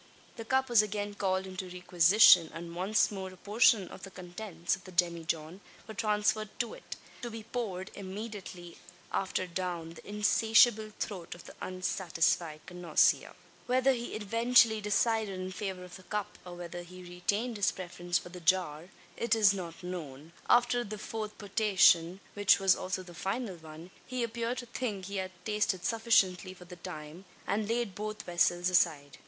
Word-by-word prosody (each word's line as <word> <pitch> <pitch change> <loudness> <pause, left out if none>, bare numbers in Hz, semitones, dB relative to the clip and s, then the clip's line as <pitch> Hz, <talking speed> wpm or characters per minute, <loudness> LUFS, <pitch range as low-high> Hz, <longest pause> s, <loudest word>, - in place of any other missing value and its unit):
The 225 - -7
cup 265 +2 +1
was 240 -4 +6
again 205 -1 -3
called 190 -1 -1
into 185 0 -6
requisition; 180 0 +6
and 170 0 -7
once 195 +6 +2
more 190 -2 -5
a 185 - -14
portion 210 -1 +3
of - - -11
the 195 - -8
contents 180 -1 -4
of 190 - -16
the 185 - -11
demijohn 170 0 -1 0.3
were 220 - -7
transferred 215 -1 0
to 235 -2 -2
it - - -9 0.3
to 240 - -4
be 225 -1 -8
poured 200 -6 -4
immediately 190 -3 -8 0.3
after 190 -1 -1
down 175 -2 -4
the 165 - -13
insatiable 220 +1 +4
throat 180 -5 -5
of 175 - -13
the - - -12
unsatisfied 175 -3 -1
connoisseur. 175 -3 +2 0.3
Whether 260 +2 +3
he 240 -1 -5
eventually 230 +1 +4
decided 210 -1 +1
in 185 0 -4
favour 190 -1 -5
of 180 0 -10
the - - -15
cup, 210 +2 -4
or 175 - -8
whether 175 0 -7
he 180 +1 -12
retained 205 +7 -2
his 200 - +2
preference 175 -1 -3
for - - -7
the 180 0 -9
jar, 170 -1 +1 0.3
is 220 -3 +4
not 170 -3 -7
known. 165 -4 -7 0.2
After 240 0 +4
the 215 -1 -6
fourth 215 0 -6
potation, 195 -4 +3
which 205 -1 +4
was 195 -1 +4
also 185 0 -3
the 175 -1 -12
final 195 +2 -3
one, 160 +2 -12 0.2
he 255 -1 -2
appeared 235 +1 -2
to 245 - -5
think 230 -5 -4
he 200 +1 -5
had 190 -1 -2 0.2
tasted 210 -4 0
sufficiently 195 -5 +2
for 180 - -14
the 180 0 -11
time, 155 +2 -9 0.2
and 210 +1 -1
laid 230 -3 -1
both 215 +2 -5
vessels 175 0 +2
aside. 150 -5 +1
190 Hz, 170 wpm, -31 LUFS, 175-215 Hz, 0.3 s, was